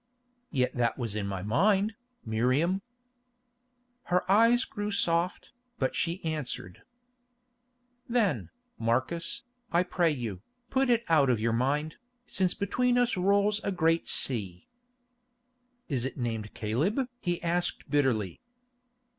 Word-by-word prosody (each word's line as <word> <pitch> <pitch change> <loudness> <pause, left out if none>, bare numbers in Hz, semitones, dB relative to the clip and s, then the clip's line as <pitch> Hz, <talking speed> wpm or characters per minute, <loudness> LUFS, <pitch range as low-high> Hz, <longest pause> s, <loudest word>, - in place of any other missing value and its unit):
"Yet 130 -3 0
that 120 -2 0
was 115 -5 -3
in 105 -2 -2
my 95 -2 -4
mind, 195 - +2 0.3
Miriam." 130 - +1 1.2
Her 180 0 +2
eyes 230 +4 +5
grew 205 -1 -4
soft, 175 -3 0 0.3
but 130 - 0
she 170 +1 -2
answered: 140 - -4 1.3
"Then, 230 -5 +1 0.3
Marcus, 130 - -1 0.3
I 175 +1 +4
pray 175 -2 +1
you, 115 - -4 0.3
put 265 -1 +2
it 235 -1 +3
out 150 -5 +4
of 120 -3 +2
your 115 +1 +1
mind, 145 +6 0 0.3
since 185 -5 0
between 245 +5 +1
us 245 -1 +2
rolls 200 +3 +2
a - - -1
great 165 -2 +1
sea." 95 -9 +1 1.2
"Is 130 -7 -1
it 130 - -4
named 115 -4 -3
Caleb?" 155 - 0
he 175 -4 -1
asked 175 +1 -1
bitterly. 125 - 0
165 Hz, 120 wpm, -29 LUFS, 120-195 Hz, 1.3 s, eyes